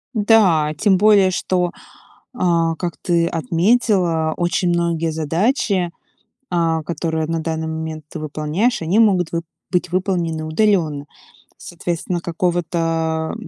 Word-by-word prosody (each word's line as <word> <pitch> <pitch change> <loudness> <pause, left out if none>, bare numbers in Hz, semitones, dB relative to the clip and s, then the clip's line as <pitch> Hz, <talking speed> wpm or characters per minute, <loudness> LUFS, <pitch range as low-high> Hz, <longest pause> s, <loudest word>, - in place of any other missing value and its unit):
Да, 195 -9 +4
тем 195 -3 +3
более 205 -2 +5
что, 180 -1 -1 0.6
э, - - -13 0.4
как 175 -2 -3
ты 170 -1 +1
отметила, 170 - +1
очень 175 +1 0
многие 170 -1 0
задачи, 175 - 0 0.6
а, 165 -2 +1
которые 160 -1 -2
на 165 0 -2
данный 160 0 -3
момент 160 -1 -5
ты - - -7
выполняешь, 155 - -1
они 175 +7 +1
могут 185 -7 +3
вы 170 - 0 0.3
быть 180 -1 -1
выполнены 175 -4 -1
удаленно. 155 -5 +1 0.5
Соответственно, 175 0 -4
какого-то 165 -2 -1
170 Hz, 115 wpm, -19 LUFS, 160-185 Hz, 0.6 s, более